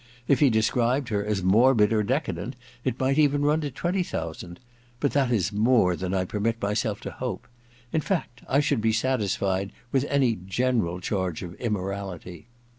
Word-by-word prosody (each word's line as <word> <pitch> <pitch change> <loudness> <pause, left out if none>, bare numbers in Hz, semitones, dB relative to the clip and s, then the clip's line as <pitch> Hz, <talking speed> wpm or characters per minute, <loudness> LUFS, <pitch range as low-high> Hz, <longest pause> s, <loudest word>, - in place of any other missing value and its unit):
If 140 - +4
he 145 - +5
described 120 +4 +1
her 105 -2 0
as 105 -2 -1
morbid 110 +2 +4
or 105 -1 +2
deca 130 - 0
dent, 100 +10 -6 0.3
it 120 - -2
might 135 +3 +2
even 145 -1 +3
run 150 +2 +2
to 145 - -2
twenty 175 +8 -1
thousand; 85 - -5 0.4
but 145 - +1
that 135 -3 +1
is 105 -3 +1
more 105 -4 +3
than 90 +1 -4
I 95 -1 0
permit 115 +4 -1
myself 105 +1 -1
to - - -6
hope. 125 -1 -5 0.5
In 160 - +2
fact 145 - -3
I 140 +3 +4
should 140 -6 +1
be 110 0 +2
satisfied 100 -5 0 0.2
with 135 0 +2
any 135 -4 +3
general 110 -5 0
charge 95 -3 -2
of 85 -1 -7
immorality. 100 -4 -4
115 Hz, 180 wpm, -26 LUFS, 95-130 Hz, 0.5 s, he